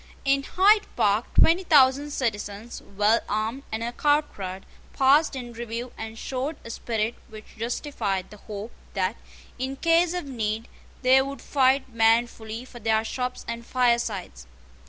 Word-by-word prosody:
In 275 0 +3
Hyde 410 +8 +4
Park 210 +3 +1
twenty 345 +3 +5
thousand 285 -3 +5
citizens, 220 -4 -3 0.2
well 215 +3 +4
armed 220 +5 -1
and 220 +1 -2
accoutred, 235 -8 -1 0.3
passed 275 +3 +4
in 240 -2 -6
review, 235 +1 -5
and 220 0 -7
showed 270 +6 -3
a 230 - -6
spirit 225 -1 -2 0.2
which 215 -1 -12
justified 225 -5 -3
the 210 - -11
hope 210 +2 -7 0.2
that, 190 +2 0 0.4
in 265 +1 -2
case 335 +3 +3
of 355 - -3
need, 225 -4 -3 0.4
they 260 +1 +6
would 275 +1 -5
fight 265 -1 +2
manfully 225 0 +1
for 245 -2 -12
their 220 0 +2
shops 250 +2 -4
and 235 0 -4
firesides. 235 - 0
235 Hz, 140 wpm, -25 LUFS, 220-270 Hz, 0.4 s, they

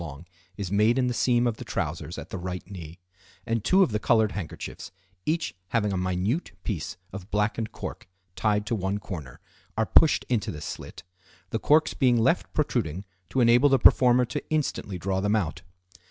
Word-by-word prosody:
long 80 0 -8 0.3
is 100 -3 -4
made 105 +4 +3
in 130 - +2
the 125 - 0
seam 120 0 +2
of 115 -2 0
the - - -7
trousers - - -4
at - - -8
the - - -3
right 90 0 -5
knee, 85 -3 -8 0.5
and 115 -2 -1
two 190 +8 +5
of 155 - 0
the 105 - 0
colored 110 -1 +3
handkerchiefs, 95 -6 -7 0.4
each 165 +1 0
having 105 +1 0
a - - -1
minute 95 - -1
piece 90 -5 -4 0.2
of 95 0 -8
blackened 105 +1 -1
cork 110 - -7 0.3
tied 105 -1 +1
to 110 - -2
one 100 -2 -1
corner, 80 -11 -8 0.4
are 110 - +2
pushed 155 +8 +4
into 120 -4 0
this 75 -1 -6
slit, - - -8 0.5
the 110 - -1
corks 155 +5 +3
being 125 -3 +3
left 115 - +2
protruding 85 +5 -1 0.2
to 130 - +1
enable 120 +4 +6
the 135 - +5
performer 125 0 +6
to - - -4
instantly 145 -10 -1
draw 95 +2 -1
them 105 +2 +2
out. 85 -7 -1
105 Hz, 185 wpm, -26 LUFS, 95-120 Hz, 0.5 s, enable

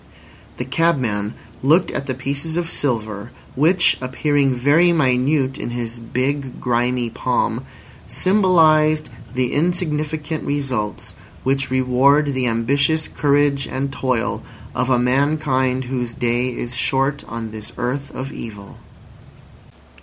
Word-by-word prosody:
The 125 - -3
cabman 125 -9 0 0.3
looked 160 +7 +3
at 140 - -3
the 130 - -2
pieces 140 +5 -2
of 170 -1 -2
silver, 110 -5 -2 0.2
which, 165 +7 +4
appearing 135 +1 +1
very 145 +8 +4
minute 135 -2 +2
in - - -4
his 120 -1 -4
big, 130 +3 -2
grimy 120 -1 0
palm, - - -1 0.4
symbolised 155 - +3 0.2
the 125 -1 0
insignificant 155 -2 -1
results 130 -8 -3 0.3
which 135 0 0
reward 130 +3 +3
the 130 -1 0
ambitious 140 +7 +1
courage 145 -1 +1
and 135 +1 -3
toil 130 -5 -1 0.3
of 125 +1 -1
a 130 - +4
mankind 130 0 +1
whose 125 -2 -4
day 120 +1 0
is 120 0 -5
short 135 +3 0
on 115 -1 -5
this 110 -1 -6
earth 135 +3 -2
of 135 +2 -5
evil. 105 -3 -9
135 Hz, 120 wpm, -20 LUFS, 125-150 Hz, 0.4 s, which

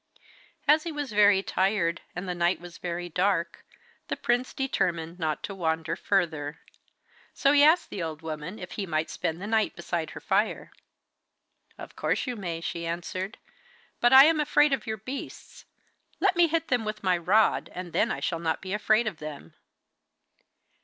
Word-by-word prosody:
As 300 +2 +6
he 335 - -5
was 290 -4 -4
very 205 -2 +5
tired, 190 -4 0
and 180 +2 -5
the 180 - -1
night 175 +1 +1
was 175 -1 -11
very 175 0 -4
dark, 175 -1 0 0.4
the - - -3
prince 245 +1 0
determined 175 -10 -2
not 155 -2 -2
to 200 - -5
wander 165 -3 -1
further. 160 -6 -1 0.8
So 275 - +3
he 290 0 +6
asked 315 +4 +4
the 190 - -4
old 160 -1 -5
woman 160 +5 -5
if 180 -2 -8
he 200 -2 -4
might 155 -1 -1
spend 165 +1 -3
the 195 - -6
night 220 0 +1
beside 170 -2 -3
her - - -8
fire. 205 +3 0 1.1
'Of - - -10
course - - 0
you 250 -2 -3
may,' 170 -6 -4
she 170 0 -4
answered. 185 +4 -4 0.6
'But 240 - +4
I 265 0 +11
am 320 0 +3
afraid 295 -1 +3
of 250 -5 -2
your 220 0 -2
beasts. 255 +7 -8 0.5
Let 390 -2 +3
me 345 -1 +5
hit 330 0 -1
them 245 -3 +1
with 215 -1 -5
my 185 -1 +3
rod, 190 +6 +2
and 180 -2 -7
then - - +2
I - - -3
shall 165 - -1
not 165 -1 -1
be 190 0 -6
afraid 215 +2 +2
of 210 -6 -3
them. 150 -2 -9
190 Hz, 180 wpm, -27 LUFS, 170-225 Hz, 1.1 s, I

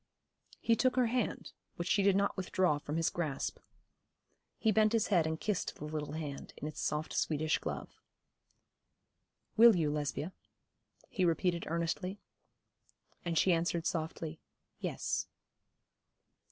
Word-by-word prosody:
He 230 - +3
took 255 +3 +2
her 255 -1 +4
hand, 235 -1 -1 0.2
which 170 - -4
she 200 - +3
did 195 -1 +4
not 200 0 +2
withdraw 185 -4 +1
from 150 +2 -4
his 165 - +2
grasp. 155 -6 -2 1.0
He 220 - +3
bent 215 +1 +4
his 225 -2 +2
head 170 -6 +4
and 160 0 -2
kissed 210 -4 -1
the 150 - -7
little 150 -1 -4
hand 150 -3 -5
in 150 - -4
its 155 - -5
soft 150 +1 -1
Swedish 155 0 +1
glove. - - -6 1.6
'Will 230 -1 +9
you, 155 -4 +1
Lesbia?' 150 +3 -2 0.7
he 190 - -1
repeated 170 0 +1
earnestly; 170 +4 -2 1.0
and 170 -2 -1
she 185 - +5
answered 170 0 0
softly, 160 -1 -3 0.4
'Yes.' - - -2
170 Hz, 135 wpm, -33 LUFS, 155-200 Hz, 1.6 s, Will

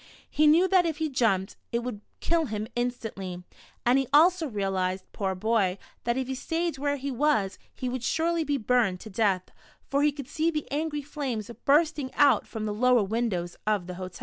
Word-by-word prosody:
He 305 0 +4
knew 335 +5 +6
that 370 -2 +4
if 320 -2 -2
he 315 0 -1
jumped, 210 -7 +1 0.2
it 235 0 -1
would 235 -4 -5 0.2
kill 335 -1 +1
him 215 -1 -3
instantly, 225 -7 -3 0.4
and 250 +3 +5
he 270 - -1
also 330 +3 +5
realized, 190 -4 -1
poor 190 -2 -2
boy, 200 -2 +1 0.3
that 235 +1 +1
if 260 -1 -1
he 265 - -2
stayed 325 +3 -2
where 285 0 0
he 280 0 -4
was, 250 -7 +1 0.2
he 255 - -4
would 250 -1 -3
surely 330 +4 +1
be 290 -2 0
burned 225 -6 +1
to 220 - -9
death, 190 -3 0 0.4
for 280 0 +2
he 295 0 +4
could 280 -3 -8
see 315 +3 0
the 305 -3 -3
angry 295 0 -2
flames 260 -7 -4
bursting 295 -1 +3
out 290 -1 +4
from 220 -2 -5
the 210 - -2
lower 245 +1 +4
windows 195 -5 -2
of 210 -4 +1
the 180 - -6
hotel. 185 0 -7
250 Hz, 200 wpm, -27 LUFS, 205-295 Hz, 0.4 s, knew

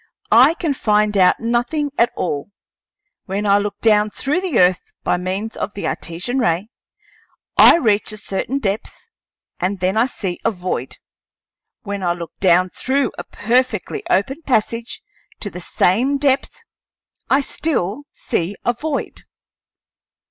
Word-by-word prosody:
I 260 +8 +7
can 320 -5 -1
find 210 -4 +1
out 185 -2 +4
nothing 240 +6 -1
at 235 -2 +3
all. 150 -1 -3 0.8
When 200 +1 -3
I 200 0 +4
look 205 0 -4
down 210 -1 +4
through 290 - -1
the 360 -10 -1
earth 180 0 +4 0.2
by - - +1
means 190 +5 -4
of 210 - -4
the 200 - -4
Artesian 185 +11 -3
ray 180 -1 0 0.9
I - - +8
reach 215 -10 +1
a 215 - -6
certain 215 +5 -3
depth 220 - -4 0.5
and 190 +2 -1
then 185 +4 0
I 230 +3 +4
see 190 -8 -4
a - - +3
void; 180 - -4 0.9
when 200 0 -4
I 175 -2 +1
look 170 -1 -7
down 185 -1 +3
through 270 -1 0
a - - -4
perfectly 235 -1 -1
open 270 - +1
passage 235 - -1 0.4
to 205 - -5
the 180 - -7
same 245 +11 +2
depth, 280 - 0 0.7
I 270 - +4
still 280 - -2
see 175 +4 -3
a 240 - +3
void." 295 +4 -4
215 Hz, 145 wpm, -19 LUFS, 185-260 Hz, 0.9 s, I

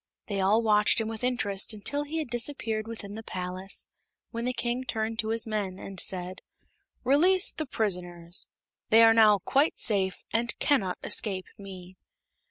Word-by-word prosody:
They 200 -2 -3
all 205 +4 +3
watched 210 0 +4
him 225 - -1
with 225 +1 -6
interest 220 -5 0
until 285 +8 0
he 310 +3 -4
had 305 -6 -3
disappeared 230 -3 -2
within 220 -3 -7
the 220 - -6
palace, 185 -1 -4 0.5
when 230 0 -4
the 250 - +1
King 240 +1 -2
turned 225 -2 -3
to 220 - 0
his 225 0 +1
men 205 -4 -3
and 195 -1 -7
said: 180 0 -1 0.6
"Release 355 +9 +4
the 310 - -4
prisoners. 175 -6 -3 0.4
They 225 +1 +7
are 225 0 +7
now 215 -2 +6
quite 285 +4 +2
safe, 195 -4 +1
and 230 +1 0
cannot 205 -11 +1
escape 190 -4 -1
me." 185 -2 -11
220 Hz, 165 wpm, -28 LUFS, 195-240 Hz, 0.6 s, They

